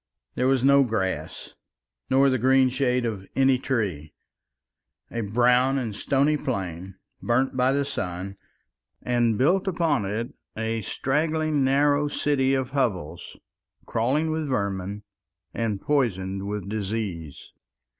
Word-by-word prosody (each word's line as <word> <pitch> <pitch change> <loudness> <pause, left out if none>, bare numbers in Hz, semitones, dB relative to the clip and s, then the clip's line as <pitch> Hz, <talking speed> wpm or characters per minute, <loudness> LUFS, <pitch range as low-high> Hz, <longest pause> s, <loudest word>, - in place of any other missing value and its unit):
There 125 - 0
was 130 -2 +2
no 140 0 +6
grass 95 - -3 0.6
nor 135 +1 +4
the 130 - +1
green 130 +2 +4
shade 125 -1 0
of 100 -4 -4
any 135 -1 +3
tree. 95 - -2 1.0
A 115 - -2
brown 125 +5 +3
and 115 -6 -3
stony 140 +6 +1
plain, 95 - -4 0.3
burnt 130 +3 +1
by 130 +1 +3
the 140 +1 +1
sun, 95 -7 -4 0.7
and, 120 -3 +1
built 180 - +2
upon 165 - +1
it 115 +7 -3 0.2
a 110 0 -2
straggling 155 - 0
narrow 145 +2 +3
city 135 -2 +1
of 130 -1 -2
hovels 110 - -2 0.5
crawling 140 +8 0
with 155 -1 -2
vermin 100 -4 -2 0.5
and 110 -4 -2
poisoned 100 -8 -1
with 105 -2 -4
disease. 100 -7 -4
125 Hz, 125 wpm, -25 LUFS, 100-135 Hz, 1.0 s, no